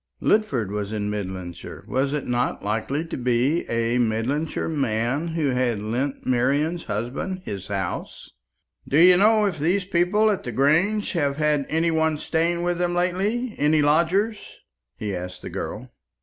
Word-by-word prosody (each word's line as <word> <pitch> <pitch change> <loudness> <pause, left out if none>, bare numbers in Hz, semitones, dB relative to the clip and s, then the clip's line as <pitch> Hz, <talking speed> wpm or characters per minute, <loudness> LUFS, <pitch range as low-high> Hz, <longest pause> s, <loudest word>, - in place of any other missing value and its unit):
Lidford 135 - +1
was 105 0 -3
in 105 -1 -2
Midlandshire. 95 -4 -6
Was 135 +2 0
it 150 -1 -2
not 120 0 -1
likely 115 +9 -1
to 165 - -5
be 125 +6 0
a 115 +1 +1
Midlandshire 120 +7 -1
man 135 0 -1
who 150 -4 +1
had 125 -4 0
lent 120 +7 -3
Marian's 140 +7 +1
husband 135 - -4
his 95 -2 -6
house? 95 -3 -4 0.6
"Do 140 - +2
you 180 +2 +8
know 215 +3 +4
if 180 -6 -2
these 180 +6 +1
people 195 +4 +2
at 200 - -2
the 120 - -4
Grange 165 - +2
have 145 -6 0
had 150 -2 +1
any 165 +2 +1
one 160 -1 +1
staying 170 +3 0
with 175 0 -1
them 175 0 0
lately 200 +7 0
any 150 +1 +3
lodgers?" 180 +9 +2 0.6
he 105 -3 -3
asked 90 0 -7
the - - -6
girl. - - -6
145 Hz, 160 wpm, -24 LUFS, 115-175 Hz, 0.6 s, you